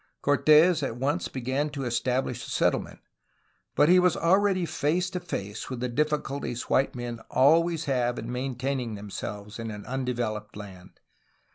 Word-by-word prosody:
Cortes 155 Hz, +4 st, +5 dB
at 125 Hz, -4 st, -3 dB
once 145 Hz, +7 st, -1 dB
began 130 Hz, +4 st, -2 dB
to 145 Hz, -2 st, -5 dB
establish 125 Hz, +2 st, -1 dB
a -, -, -9 dB
settlement, -, -, 0 dB, 0.7 s
but 145 Hz, -, +5 dB
he 180 Hz, +2 st, +6 dB
was 180 Hz, -2 st, +3 dB
already 190 Hz, +1 st, +3 dB
face 165 Hz, +3 st, 0 dB
to 180 Hz, -, -3 dB
face 105 Hz, -, -5 dB
with 130 Hz, -2 st, -5 dB
the 125 Hz, +1 st, -2 dB
difficulties 140 Hz, -3 st, -1 dB
white 135 Hz, 0 st, +2 dB
men 120 Hz, -1 st, -5 dB
always 165 Hz, +3 st, +3 dB
have 125 Hz, -4 st, 0 dB
in 115 Hz, +2 st, -5 dB
main 125 Hz, +1 st, -3 dB
taining 125 Hz, -3 st, -2 dB
themselves 105 Hz, +1 st, -7 dB
in 115 Hz, 0 st, -4 dB
an 105 Hz, -1 st, -8 dB
undeveloped 120 Hz, -5 st, -3 dB
land. 95 Hz, -3 st, -11 dB
130 Hz, 155 wpm, -27 LUFS, 120-155 Hz, 0.7 s, he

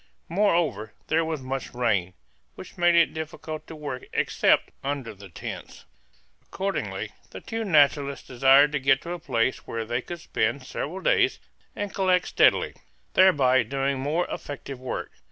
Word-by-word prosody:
Moreover, 170 Hz, -, +1 dB, 0.2 s
there 165 Hz, +1 st, +3 dB
was 160 Hz, -4 st, -3 dB
much 130 Hz, -1 st, -5 dB
rain, 100 Hz, -7 st, 0 dB, 0.4 s
which -, -, -11 dB
made 175 Hz, -1 st, +4 dB
it 170 Hz, -1 st, +4 dB
difficult 155 Hz, 0 st, -6 dB
to 160 Hz, -, -9 dB
work 145 Hz, -4 st, -6 dB
except -, -, +2 dB
under 140 Hz, -4 st, -3 dB
the 100 Hz, -1 st, -13 dB
tents. 85 Hz, -, -8 dB, 0.6 s
Accordingly, 195 Hz, +1 st, -4 dB, 0.2 s
the -, -, -8 dB
two 225 Hz, -1 st, -4 dB
naturalists 145 Hz, -, +3 dB
desired 135 Hz, +3 st, +5 dB
to 150 Hz, -, 0 dB
get 135 Hz, 0 st, +3 dB
to 170 Hz, -, -6 dB
a 175 Hz, -, -4 dB
place 125 Hz, -5 st, -1 dB
where 115 Hz, -1 st, -3 dB
they 120 Hz, +2 st, -1 dB
could 175 Hz, +6 st, -7 dB
spend 125 Hz, -4 st, -1 dB
several 165 Hz, +7 st, -5 dB
days -, -, +2 dB, 0.4 s
and 205 Hz, -1 st, -4 dB
collect 185 Hz, -2 st, +2 dB
steadily, -, -, +3 dB, 0.4 s
thereby 135 Hz, -9 st, +5 dB
doing 135 Hz, +3 st, -1 dB
more 150 Hz, +6 st, 0 dB
effective 140 Hz, -2 st, -6 dB
work. 130 Hz, -1 st, -5 dB
140 Hz, 155 wpm, -26 LUFS, 130-170 Hz, 0.6 s, desired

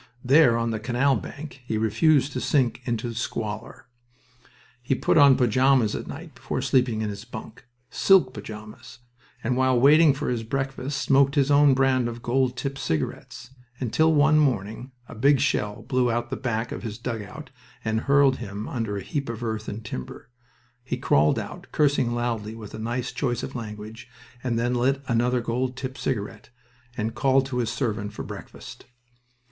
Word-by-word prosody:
There, 135 Hz, -3 st, +5 dB
on 115 Hz, 0 st, -1 dB
the 110 Hz, -, -2 dB
canal 125 Hz, +4 st, +1 dB
bank, 140 Hz, +4 st, -8 dB
he 115 Hz, -3 st, -2 dB
refused 130 Hz, +6 st, +2 dB
to 125 Hz, -, -3 dB
sink 125 Hz, -4 st, +1 dB
into 120 Hz, -2 st, -2 dB
the -, -, -5 dB
squalor. 110 Hz, -2 st, -5 dB, 1.0 s
He 125 Hz, +2 st, 0 dB
put -, -, +1 dB
on 140 Hz, -3 st, +7 dB
pajamas 130 Hz, -1 st, +3 dB
at -, -, -5 dB
night -, -, -9 dB
before -, -, -4 dB
sleeping 125 Hz, -4 st, +1 dB
in 105 Hz, -, -2 dB
his 100 Hz, 0 st, -8 dB
bunk 115 Hz, -1 st, -10 dB, 0.2 s
silk 180 Hz, -10 st, +4 dB
pajamas 110 Hz, +1 st, -10 dB, 0.5 s
and 125 Hz, +2 st, 0 dB
while 130 Hz, -1 st, +3 dB
waiting 150 Hz, +2 st, +6 dB
for 150 Hz, +2 st, -3 dB
his 120 Hz, -2 st, -1 dB
breakfast 135 Hz, +3 st, -3 dB
smoked 140 Hz, +1 st, +3 dB
his 140 Hz, -1 st, +2 dB
own 145 Hz, -1 st, +6 dB
brand 130 Hz, -2 st, +2 dB
of 115 Hz, 0 st, -8 dB
gold 125 Hz, 0 st, +1 dB
tipped 135 Hz, +1 st, -4 dB
cigarettes, 120 Hz, -, -4 dB, 0.3 s
until 155 Hz, +6 st, +2 dB
one 155 Hz, 0 st, +4 dB
morning 120 Hz, -2 st, -1 dB, 0.2 s
a -, -, -10 dB
big 135 Hz, +5 st, +3 dB
shell 105 Hz, -3 st, -1 dB
blew 125 Hz, -2 st, +1 dB
out 120 Hz, +1 st, -2 dB
the -, -, -1 dB
back 120 Hz, -2 st, -3 dB
of -, -, -5 dB
his 110 Hz, -3 st, -6 dB
dugout 115 Hz, +4 st, -6 dB, 0.3 s
and 110 Hz, 0 st, 0 dB
hurled 140 Hz, -1 st, +5 dB
him 105 Hz, -1 st, -6 dB
under 115 Hz, -4 st, -3 dB
a 100 Hz, -, -5 dB
heap 140 Hz, +5 st, -3 dB
of 115 Hz, 0 st, -5 dB
earth 110 Hz, -1 st, -3 dB
and 110 Hz, +2 st, -7 dB
timber. 90 Hz, -, -7 dB, 0.5 s
He 125 Hz, -, -3 dB
crawled 75 Hz, +1 st, +3 dB
out, -, -, -6 dB
cursing 140 Hz, -5 st, +2 dB
loudly 115 Hz, -3 st, -2 dB
with 110 Hz, -2 st, -10 dB
a 110 Hz, -, -7 dB
nice 120 Hz, +3 st, -3 dB
choice 125 Hz, -2 st, -2 dB
of 130 Hz, -, -5 dB
language, 110 Hz, 0 st, -8 dB, 0.3 s
and 120 Hz, -2 st, -1 dB
then 120 Hz, +1 st, 0 dB
lit 135 Hz, +3 st, +1 dB
another 120 Hz, +1 st, +1 dB
gold 125 Hz, +2 st, -2 dB
tipped 130 Hz, 0 st, -6 dB
cigarette, 110 Hz, -3 st, -4 dB, 0.5 s
and 110 Hz, 0 st, -2 dB
called 135 Hz, +2 st, +2 dB
to 130 Hz, -2 st, -4 dB
his 115 Hz, -2 st, 0 dB
servant 110 Hz, -4 st, -2 dB
for -, -, -6 dB
breakfast. -, -, -10 dB
120 Hz, 175 wpm, -25 LUFS, 110-135 Hz, 1.0 s, on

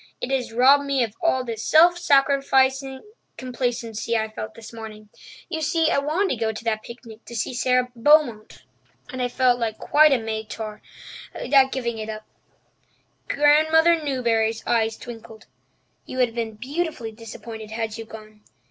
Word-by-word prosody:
It 250 Hz, -, -4 dB
has 255 Hz, -4 st, -1 dB
robbed 270 Hz, +5 st, +5 dB
me 275 Hz, -2 st, +1 dB
of 220 Hz, -3 st, -4 dB
all 260 Hz, -7 st, +1 dB
the 230 Hz, -2 st, -4 dB
self 320 Hz, +10 st, +5 dB
sacrificing 270 Hz, -2 st, +2 dB, 0.3 s
complacency 235 Hz, -3 st, -3 dB
I 220 Hz, 0 st, -2 dB
felt 215 Hz, 0 st, -7 dB
this 225 Hz, 0 st, -12 dB
morning. 215 Hz, -2 st, -10 dB, 0.4 s
You 320 Hz, -3 st, -4 dB
see, 325 Hz, +1 st, +1 dB
I -, -, +2 dB
wanted 315 Hz, +7 st, 0 dB
to -, -, -1 dB
go 220 Hz, -, 0 dB
to 220 Hz, +1 st, -9 dB
that 220 Hz, -2 st, -1 dB
picnic 230 Hz, -1 st, -12 dB
to 235 Hz, -, -10 dB
see 230 Hz, -, -2 dB
Sara 250 Hz, 0 st, +1 dB
Beaumont, 240 Hz, -4 st, +2 dB, 0.5 s
and 255 Hz, -, -5 dB
I 250 Hz, -, +1 dB
felt 245 Hz, 0 st, +2 dB, 0.2 s
quite 305 Hz, +1 st, +4 dB
like 270 Hz, -3 st, +2 dB
a -, -, -9 dB
martyr 220 Hz, -1 st, -5 dB, 0.5 s
at 265 Hz, +1 st, +3 dB
giving 235 Hz, -4 st, -3 dB
it 215 Hz, 0 st, -5 dB
up." 215 Hz, 0 st, -7 dB, 1.0 s
Grandmother 315 Hz, +3 st, +4 dB
Newbury's 230 Hz, -5 st, 0 dB
eyes 225 Hz, -1 st, +1 dB
twinkled. 225 Hz, -2 st, -11 dB, 0.6 s
"You 255 Hz, -, -7 dB
would 250 Hz, -2 st, +3 dB
have 230 Hz, -, -16 dB
been 225 Hz, -2 st, -3 dB
beautifully 265 Hz, 0 st, -4 dB
disappointed 220 Hz, 0 st, -10 dB
had 220 Hz, 0 st, -4 dB
you 225 Hz, -, -6 dB
gone. 215 Hz, -1 st, -13 dB
240 Hz, 165 wpm, -23 LUFS, 220-275 Hz, 1.0 s, robbed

